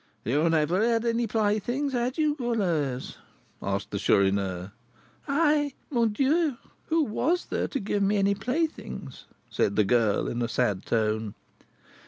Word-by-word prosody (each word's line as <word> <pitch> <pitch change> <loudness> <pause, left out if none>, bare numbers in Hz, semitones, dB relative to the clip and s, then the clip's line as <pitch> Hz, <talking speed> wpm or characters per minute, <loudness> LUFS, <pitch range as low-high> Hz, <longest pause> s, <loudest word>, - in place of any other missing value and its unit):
"You 130 +6 +1
had 165 +1 +2
never 165 +6 +2
had 230 0 +2
any 235 0 +1
playthings, 225 +6 0
had 245 +3 -1
you, 305 -2 +2
Goualeuse?" 180 - -1 0.4
asked - - -3
the - - -2
Chourineur. 95 -1 +1 0.6
"I? 295 -1 +2 0.2
Mon 235 -4 +2
Dieu! 280 +4 +1 0.3
who 325 0 +2
was 320 +9 0
there - - -2
to 275 - -3
give 205 0 -1
me 200 +1 +2
any 200 0 +3
playthings?" 250 - -3 0.3
said 100 - +1
the 105 - +3
girl, 110 -1 +2
in 120 - -3
a 120 - 0
sad 115 -5 -1
tone. 110 -2 0
210 Hz, 150 wpm, -27 LUFS, -, 0.6 s, any